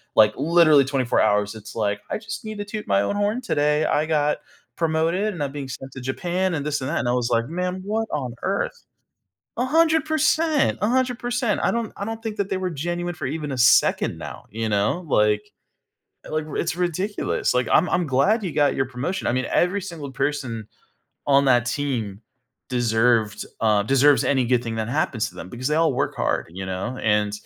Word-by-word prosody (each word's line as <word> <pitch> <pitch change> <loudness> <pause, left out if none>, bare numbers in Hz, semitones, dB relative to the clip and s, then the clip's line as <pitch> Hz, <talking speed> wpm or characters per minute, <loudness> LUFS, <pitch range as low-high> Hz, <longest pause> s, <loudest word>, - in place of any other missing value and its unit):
like, 110 -1 +6
literally 155 -1 +5
24 130 -2 +1
hours, 105 0 +2
it's 110 -1 -11
like, 105 -2 -1
"I - - -1
just 215 +2 -7
need 215 -1 -6
to 205 - -4
toot 210 +1 -6
my 100 0 +3
own 150 - -1
horn 205 +4 0
today. 150 -8 +1
I 155 +1 +1
got 150 -2 +1 0.4
promoted, 165 +5 0
and 165 -6 -4
I'm 140 - -3
being 140 -2 -6
sent 135 +1 -8
to 135 -1 -9
Japan, 175 +7 -1
and 145 -1 -3
this 145 -2 -1
and 130 - -3
that." 170 - -1
and 120 - -2
I 120 - +2
was 125 -1 0
like, 115 0 +1
"Man, 180 +3 -3
what 220 +2 -1
on 130 -5 -3
earth?" 200 - -2 0.7
100%, 315 +2 +2
100%. 245 -1 0
I - - +2
don't 235 -1 -2
I 200 - -4
don't 225 +1 -5
think 220 -2 -4
that 200 -1 -1
they 190 - 0
were 185 -1 -2
genuine 175 +3 -3
for 175 - -5
even 150 0 -4
a 130 - -3
second 120 0 +4
now, - - -8
you 110 +1 -3
know? 105 - 0
Like 105 -4 +2 0.8
like 155 0 -2
r 155 - -8
It's 145 - -1
ridiculous, 180 +4 -1
like, 125 -2 +1
"I'm 180 - +4
I'm 175 - +1
glad 195 - +2
you 175 - -2
got 145 -2 +2
your 135 - +1
promotion." 130 +10 -4
I - - +2
mean, 130 +1 -1
every 185 +3 +2
single 165 -7 -7
person 125 -5 -2 0.6
on 140 0 +5
that 120 -2 +4
team 120 -6 -2 0.5
deserved, 115 -3 +1 0.2
uh 105 -2 +3
deserves 135 +5 +4
any 135 -3 +2
good 125 0 +2
thing 115 -1 -4
that 110 0 -3
happens 120 -5 0
to - - -19
them, - - -8
because 125 +2 -4
they 150 - +1
all 160 -3 +3
work - - -1
hard, - - -1
you 95 +2 -6
know, 95 +7 -4
and 105 -1 +2
145 Hz, 205 wpm, -23 LUFS, 120-185 Hz, 0.8 s, like